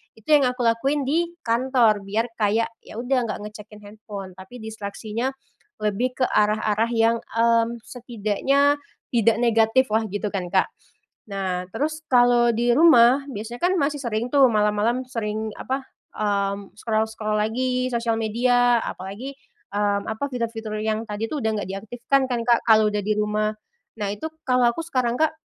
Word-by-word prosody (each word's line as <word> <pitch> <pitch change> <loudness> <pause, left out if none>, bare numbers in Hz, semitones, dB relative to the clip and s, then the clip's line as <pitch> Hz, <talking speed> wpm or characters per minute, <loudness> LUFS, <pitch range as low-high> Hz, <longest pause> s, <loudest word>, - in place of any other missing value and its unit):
itu 220 +3 -22
yang 295 -2 +6
aku 250 +1 -3
lakuin 270 +5 +1
di 335 +4 +1 0.2
kantor. 235 -2 +2
Biar 220 +4 -1
kayak, 215 +2 +2 0.2
ya - - -12
udah 250 +1 +1
nggak 210 - -4
ngecekin 210 0 -12
handphone, 205 -2 -9
tapi 215 +6 -11
distraksinya 220 +3 -4 0.5
lebih 235 +5 0
ke - - +5
arah-arah 215 +1 +2
yang, 230 0 +3
mmm, 230 0 +1
setidaknya 245 +4 0 0.4
tidak 230 -2 +3
negatiflah 225 0 +3
gitu 205 +1 -2
kan, 185 -3 -3
Kak. 190 - +3 0.7
Nah, 185 -2 -2
terus 310 +2 -2
kalau 245 -1 +5
di 240 +2 +2
rumah, 260 -3 +6
biasanya 235 -1 -7
kan 360 +2 +2
masih 290 0 0
sering 235 -2 -2
tuh 275 -2 +6
malam-malam 210 +4 +1
sering 220 -2 -3
apa, 265 +1 -3 0.3
mmm, 200 -1 -1
scroll-scroll 220 -1 -1
lagi 255 +3 0
sosial 230 -1 0
media 245 +2 +3
apalagi, 200 +9 -6 0.4
mmm, 205 0 0
apa, 220 +5 -3
fitur-fitur 230 -3 -4
yang 220 +1 -1
tadi 210 +2 -3
tuh 295 +2 -3
udah 220 -1 0
gak - - -10
diaktifkan 240 +7 -1
kan, 240 -1 0
Kak, 235 - +4
kalau 220 -1 +6
udah 210 - 0
di 215 - +1
rumah. 210 0 0 0.5
Nah 205 - -1
itu, 210 +10 -5 0.2
kalau 250 -2 +3
aku 330 - -6
sekarang, 250 -7 0
Kak, 315 - +3
230 Hz, 155 wpm, -23 LUFS, 210-250 Hz, 0.7 s, yang